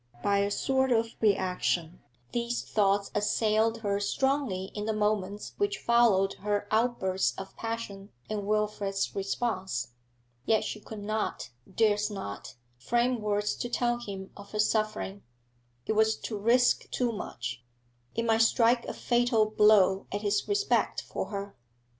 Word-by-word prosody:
By 200 0 +3
a 200 0 +1
sort 265 +5 +1
of 230 -1 +1
reaction, 180 -4 0 0.3
these 240 0 -2
thoughts 200 -1 +1
assailed 215 +2 +2
her 200 -1 0
strongly 205 -3 0
in 210 0 -4
the 220 - 0
moments 210 -1 -1
which 405 0 0
followed 225 -5 +3
her 205 0 -1
outburst 215 -5 +1
of 195 0 -8
passion 225 -3 -5 0.2
and 205 -2 -3
Wilfrid's 210 -2 0
response. 190 - -2 0.5
Yet 220 +7 +2
she 215 - -4
could 210 0 -9
not 215 -7 -2 0.2
durst 210 0 +2
not 195 - -7 0.2
frame 240 - +1
words 210 0 0
to 240 - -3
tell 240 0 +1
him 195 -4 -7
of 200 0 -12
her 210 - -3
suffering. 215 -2 0 0.6
It - - 0
was 220 0 +3
to 220 - -4
risk 235 +4 +3
too 245 -2 0
much; 120 - -6 0.5
it 230 - 0
might 225 0 +3
strike 235 +1 +4
a - - -5
fatal 240 -3 +2
blow 205 -3 +5
at 205 - -2
his 205 -1 0
respect 410 0 +1
for - - -4
her. 200 -1 -6
210 Hz, 145 wpm, -29 LUFS, 200-230 Hz, 0.6 s, blow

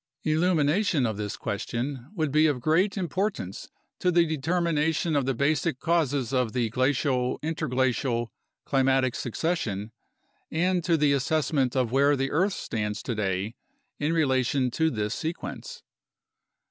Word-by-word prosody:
Illumination 160 - +2
of 110 -3 -2
this 105 -1 -4
question 120 +5 -4
would 155 -5 0
be 155 +2 +4
of 145 -4 0
great 170 - +2
importance 185 - -3 0.3
to 180 - +2
the 170 -1 +4
determination 160 0 0
of 140 -2 +1
the 135 - +1
basic 140 +1 +1
causes 145 -7 0
of 125 -4 +1
the 120 -3 0
glacial 130 0 +1
interglacial 130 -6 0 0.3
climatic 135 -2 +2
succession 115 - -2 0.6
and 180 +2 +1
to 170 -1 +2
the 145 -2 +3
assessment 140 -1 +1
of 125 -3 +1
where 140 +2 +4
the 135 0 -1
earth 185 +6 +2
stands 105 -6 -3
today 105 -3 -2 0.5
in 150 +2 0
relation 130 -4 +1
to 160 +5 +1
this 105 -5 -2
sequence. 175 - -5
140 Hz, 135 wpm, -27 LUFS, 125-160 Hz, 0.6 s, be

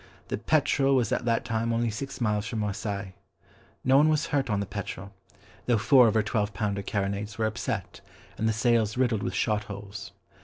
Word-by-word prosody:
The - - -2
Petrel 140 0 +2
was 120 -5 +1
at - - 0
that 115 -1 +1
time 115 0 -1
only 115 0 +1
six 135 +6 -6
miles 105 -3 0
from 115 - -4
Marseilles. 100 -2 -3 0.7
No 130 +1 +5
one 150 +2 +5
was 155 0 +2
hurt 140 -3 0
on 105 -2 +1
the 100 - -1
Petrel, 100 0 -6 0.5
though 120 -2 +4
four 125 +4 +6
of 110 - +1
her 110 - +3
twelve 105 -2 -1
pounder 100 0 -1
carronades 100 +1 -3
were 110 - +1
upset, 110 +2 -3 0.3
and 110 - 0
the - - +3
sails 115 0 +2
riddled 120 -5 +1
with 95 - -3
shot 105 -1 0
holes. 100 0 -8
110 Hz, 195 wpm, -27 LUFS, 100-120 Hz, 0.7 s, four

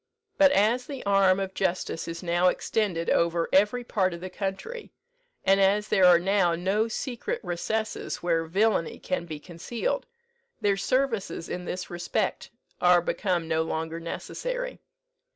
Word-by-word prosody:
But 285 -1 +7
as 240 +1 +2
the 275 -3 -6
arm 195 -1 +4
of 190 -1 -3
justice 185 -3 -2
is 165 +1 -6
now 175 +1 +2
extended 180 -3 0
over 170 0 +2
every 210 +6 +3
part 185 -6 0
of - - -9
the 185 0 -6
country, 320 - -5 0.6
and 195 +1 +5
as 205 +2 +3
there 190 -3 +4
are 180 -1 +8
now 180 -1 +2
no 195 +6 +1
secret 240 +2 -3
recesses 215 +5 -2
where 165 -2 +1
villany 195 0 +1
can 175 -2 -3
be 155 -2 -6
concealed, 205 - -3 0.5
their 200 -1 +2
services 230 -6 -1
in 180 0 -4
this 180 +1 -5
respect 175 0 -2 0.3
are 180 0 +6
become 175 -1 -1
no 160 0 +1
longer 160 0 -3
necessary. - - -5
190 Hz, 150 wpm, -27 LUFS, 170-215 Hz, 0.6 s, are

